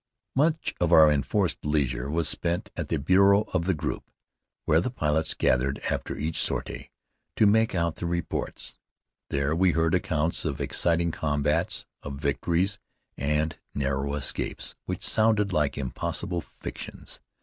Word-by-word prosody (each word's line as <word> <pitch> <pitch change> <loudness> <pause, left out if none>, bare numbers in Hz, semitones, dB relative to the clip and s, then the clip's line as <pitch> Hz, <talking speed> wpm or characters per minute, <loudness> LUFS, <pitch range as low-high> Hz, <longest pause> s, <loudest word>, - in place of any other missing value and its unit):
Much 155 +4 +2
of 85 -1 +2
our 80 -3 +8
enforced 75 +6 0
leisure 70 -4 0
was 80 +1 +1
spent 85 +1 -1
at - - -3
the - - 0
bureau 100 +2 +5
of 90 -3 +1
the 95 - +2
group, 75 - -4 0.6
where 80 +2 +4
the 110 - -1
pilots 80 -8 0
gathered 65 +2 +2
after - - -3
each 80 +2 -2
sortie - - -3 0.5
to 110 - +4
make 110 0 +3
out 85 -2 0
their 85 - -3
reports. 85 -1 -3 0.5
There 70 +2 0
we 90 0 +3
heard 80 0 +2
accounts 80 -2 +1
of - - -2
exciting 85 0 +1
combats, 75 +2 0 0.2
of 70 -1 -6
victories 85 +7 0 0.4
and 75 +3 0 0.2
narrow 70 0 -1
escapes, 70 -3 -3
which - - -4
sounded 110 -3 +2
like 75 -3 +1
impossible 70 +5 -2
fictions. - - -8
80 Hz, 145 wpm, -27 LUFS, 75-90 Hz, 0.6 s, our